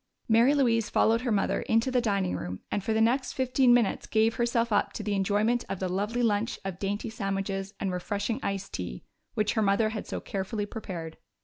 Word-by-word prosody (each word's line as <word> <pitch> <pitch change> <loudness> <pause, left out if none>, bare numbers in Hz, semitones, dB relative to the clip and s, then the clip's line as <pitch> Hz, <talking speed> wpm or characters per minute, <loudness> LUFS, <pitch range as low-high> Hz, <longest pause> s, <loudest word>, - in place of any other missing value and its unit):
Mary 235 +5 +5
Louise 230 -5 +2
followed 230 +1 +3
her 250 -2 -1
mother 200 -2 +1
into 225 +3 +1
the 250 -1 +2
dining 200 - 0
room 90 0 -5
and 205 - -1
for 220 - -1
the 220 - +2
next 245 +4 +2
fifteen 260 -1 +3
minutes 240 -4 +2
gave 220 +1 +3
herself 235 0 0
up 205 - +1
to 215 - -5
the 210 0 -1
enjoyment 205 +5 +1
of 195 - -2
the 185 - -1
lovely 205 +6 -1
lunch 215 0 +1
of 190 -2 -4
dainty 205 +3 -2
sandwiches 195 -1 -3
and 195 - -1
refreshing 205 +6 -2
iced 195 0 -3
tea 90 -10 -5 0.3
which 210 -1 +1
her 220 - +1
mother 205 +2 +3
had 215 -1 -5
so - - -3
carefully 205 +2 -3
prepared. 180 -7 -7
210 Hz, 205 wpm, -28 LUFS, 195-230 Hz, 0.3 s, Mary